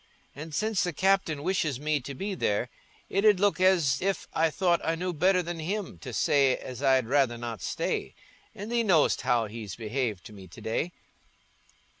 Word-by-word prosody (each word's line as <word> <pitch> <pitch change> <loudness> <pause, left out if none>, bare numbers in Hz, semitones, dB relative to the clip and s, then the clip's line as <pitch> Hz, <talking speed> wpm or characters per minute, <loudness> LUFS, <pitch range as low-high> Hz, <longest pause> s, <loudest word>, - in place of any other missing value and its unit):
And 155 +4 -8
since 215 -1 0
the 175 - -2
captain 185 -4 +1
wishes 155 -8 0
me 150 0 0
to 140 +1 -8
be 195 +7 -3
there, 120 - -1 0.4
it 195 - 0
'ud 210 -3 +5
look 200 -2 +2
as 170 -8 +3
if 195 -1 -1
I 160 0 +2
thought 175 +1 +1
I 165 - 0
knew 180 +2 -3
better 180 +3 +3
than 170 0 -5
him 195 +4 -4
to 130 - -7
say 135 +2 +3
as 125 0 -8
I'd 130 -3 +3
rather 130 -1 +2
not 115 -4 -6
stay. - - -3 0.4
And 205 +4 -7
thee 240 0 +2
know'st 180 -9 +3
how 125 -3 +2
he's 105 -3 -7
behaved 115 -4 -3
to 110 - -11
me 95 -2 -12
to 85 - -13
day." 135 +10 -2
155 Hz, 190 wpm, -28 LUFS, 125-185 Hz, 0.4 s, ud